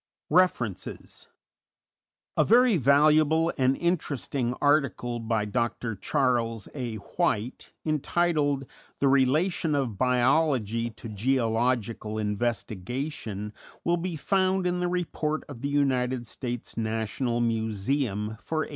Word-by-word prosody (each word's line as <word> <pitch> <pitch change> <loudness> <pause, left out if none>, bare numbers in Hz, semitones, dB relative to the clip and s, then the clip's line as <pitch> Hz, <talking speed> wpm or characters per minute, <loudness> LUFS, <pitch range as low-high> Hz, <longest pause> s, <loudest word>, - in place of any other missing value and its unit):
REFERENCES 150 - 0 1.1
_A - - +4
very 245 0 +5
valuable 155 +3 +4
and 130 0 +2
interesting 140 -7 -1
article 140 -5 +1
by 110 -2 -1
Dr. 115 +1 -2
Charles 115 -1 0
A. 125 -5 -4
White, 115 - -2
entitled 150 -2 +1 0.3
"The 140 - +2
Relation 150 +5 +2
of 125 -8 -2
Biology 125 -3 +2
to 115 - -10
Geological 115 -1 0
Investigation," 110 +1 -3 0.3
will 170 +1 +2
be 175 0 -3
found 190 +2 +1
in 180 0 0
the 180 - 0
Report 165 -3 -2
of 135 -5 -9
the 140 - -2
United 130 -3 +1
States 120 +1 -6
National 115 +2 -1
Museum 110 -1 -1
for 155 +4 -2
1892. - - -12
130 Hz, 110 wpm, -27 LUFS, 115-155 Hz, 1.1 s, very